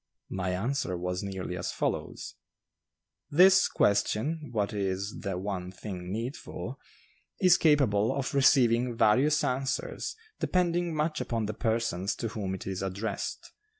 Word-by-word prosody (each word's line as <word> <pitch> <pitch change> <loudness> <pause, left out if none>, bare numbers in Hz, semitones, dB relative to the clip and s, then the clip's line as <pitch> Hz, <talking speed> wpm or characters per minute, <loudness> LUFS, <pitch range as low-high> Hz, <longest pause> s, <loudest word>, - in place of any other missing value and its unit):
My 95 0 -2
answer 110 -2 -1
was 90 +1 -2
nearly 95 -3 -4
as 90 0 -3
follows: - - -3 1.0
"This 185 +4 +6
question 135 +10 +1
'what 105 -2 -1
is 100 0 -2
the 95 -2 -3
one 95 -1 -4
thing 90 -2 -7
needful?' 120 - -5 0.6
is 185 -3 +6
capable 125 -9 +3
of 135 -2 -2
receiving 125 -3 +4
various 135 +9 +4
answers, 130 +1 -2 0.2
depending 175 -2 +1
much 155 +1 0
upon 115 -2 -1
the 105 - -3
persons 110 -4 -1
to 115 - -3
whom 100 -4 -3
it 95 - -8
is 95 -1 -3
addressed. 100 +2 -4
110 Hz, 130 wpm, -29 LUFS, 95-140 Hz, 1.0 s, This